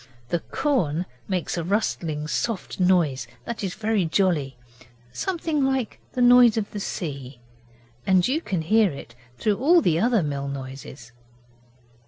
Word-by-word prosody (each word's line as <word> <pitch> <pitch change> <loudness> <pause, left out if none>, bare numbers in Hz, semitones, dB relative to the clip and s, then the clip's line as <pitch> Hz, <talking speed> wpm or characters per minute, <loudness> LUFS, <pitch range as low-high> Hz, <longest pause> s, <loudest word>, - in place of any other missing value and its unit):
The 175 - 0
corn 180 - -1 0.2
makes 180 -2 -2
a - - -2
rustling 165 -6 -1
soft 215 +4 -3
noise 175 -8 +2 0.2
that 235 -3 -5
is 190 -2 -3
very 215 -2 0
jolly 160 -6 0 0.6
something 330 -6 -1
like 265 -3 -1
the 250 - +1
noise 245 -2 +7
of 210 -2 -2
the 205 - -5
sea 140 -9 -5 0.7
and 185 -2 +4
you 290 +6 0
can 185 - -2
hear 215 +4 +4
it 140 -4 -10 0.2
through 210 - +1
all 335 +7 +5
the 165 - +2
other 225 -2 +2
mill 140 -2 -3
noises. 135 -2 -8
185 Hz, 145 wpm, -24 LUFS, 150-230 Hz, 0.7 s, noise